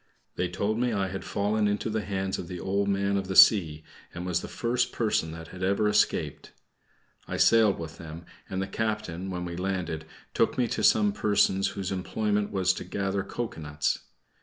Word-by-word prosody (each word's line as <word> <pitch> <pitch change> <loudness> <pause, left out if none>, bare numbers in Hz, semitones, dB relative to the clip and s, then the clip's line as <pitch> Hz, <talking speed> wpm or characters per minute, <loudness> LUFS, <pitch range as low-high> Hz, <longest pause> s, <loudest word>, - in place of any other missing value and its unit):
They - - -1
told 110 +2 -1
me 125 0 +1
I 100 -2 0
had 95 +1 -5
fallen 105 +1 0
into 105 +2 -1
the 110 0 -1
hands 95 -1 -2
of 85 - -6
the 90 -1 -6
Old 100 +2 0
Man 100 0 +1
of 95 -1 -3
the 95 - -3
Sea, 80 -9 +6 0.3
and 85 +1 -5
was 90 -1 0
the - - -6
first 120 +1 -1
person 105 -8 0
that 80 0 -9
had 90 - -10
ever 100 +3 +2
escaped. 105 0 0 0.7
I - - -3
sailed 110 -4 +5
with 80 0 -8
them, 85 +1 -9 0.2
and 95 0 -2
the - - -4
captain, 105 -4 -3
when 90 -1 -4
we 85 -1 -5
landed, 90 -4 -3 0.3
took - - +1
me 125 -2 +2
to - - -2
some 105 -2 +5
persons 100 -2 +2
whose 95 -1 -3
employment 105 +2 -1
was 95 -2 +2
to - - -6
gather 95 +2 -2
cocoanuts. 75 -11 -3
95 Hz, 190 wpm, -27 LUFS, 90-105 Hz, 0.7 s, Sea